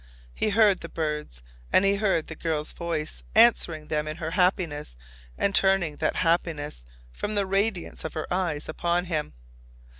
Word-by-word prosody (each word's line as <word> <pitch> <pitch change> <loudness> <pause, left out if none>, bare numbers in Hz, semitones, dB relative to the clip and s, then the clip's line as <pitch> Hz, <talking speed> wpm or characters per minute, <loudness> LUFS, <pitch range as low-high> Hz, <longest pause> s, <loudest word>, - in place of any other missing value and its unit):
He 215 - 0
heard 210 -2 +4
the - - -8
birds. 150 - -4 0.3
And 190 - +5
he 200 0 +3
heard 195 -6 +1
the 160 - -8
girl's 155 -2 -2
voice, 165 -3 -4
answering 175 -9 +4
them 150 0 -1
in 155 +1 -4
her 165 -2 -4
happiness 175 - 0 0.4
and 200 - +1
turning 190 -6 +2
that - - 0
happiness 165 - 0 0.3
from 210 - -3
the 200 -1 +2
radiance 195 -1 -1
of 160 - -5
her 155 - -2
eyes 170 -5 -1
upon 170 +2 0
him. 155 -4 -2
170 Hz, 160 wpm, -26 LUFS, 155-195 Hz, 0.4 s, And